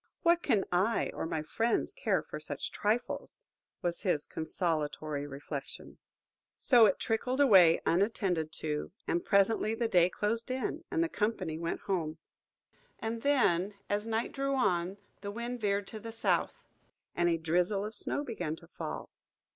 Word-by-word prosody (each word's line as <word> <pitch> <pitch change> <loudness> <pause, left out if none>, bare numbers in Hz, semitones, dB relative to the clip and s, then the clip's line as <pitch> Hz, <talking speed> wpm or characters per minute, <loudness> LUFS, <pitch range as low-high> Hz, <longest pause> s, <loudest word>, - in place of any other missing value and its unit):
"What 340 0 +4
can 200 - +2
I 190 +6 +2
or - - -3
my 160 -1 -2
friends 225 +9 0
care - - 0
for - - -7
such - - -5
trifles?" 220 +4 -1 0.5
was 175 -1 -1
his 165 -6 0
consolatory 155 -3 -2
reflection. 140 0 -7 0.6
So 240 -4 +6
it 190 - +1
trickled 250 +4 -1
away 190 -12 +7
unattended 180 -4 +1
to, 150 0 -3
and 170 - 0
presently 215 +2 +3
the 230 0 0
day 180 -4 +4
closed 225 +5 -1
in, 260 +5 -2
and 335 - +1
the - - +1
company 200 - -1
went 170 0 -3
away - - -22
home. 165 -5 -1 0.8
And 225 0 -3
then, 205 -9 +2 0.2
as 205 +2 0
night 225 +1 -1
drew 275 0 -1
on, 185 -6 +1 0.2
the 200 - -4
wind 235 +3 -4
veered 200 -1 +1
to 220 - -6
the 225 +2 -7
south, 225 - 0 0.5
and 175 0 +3
a 165 - +2
drizzle 180 +5 +1
of 215 - -6
snow 285 - -1
began 220 - -3
to - - -16
fall. - - -6
200 Hz, 160 wpm, -31 LUFS, 170-230 Hz, 0.8 s, away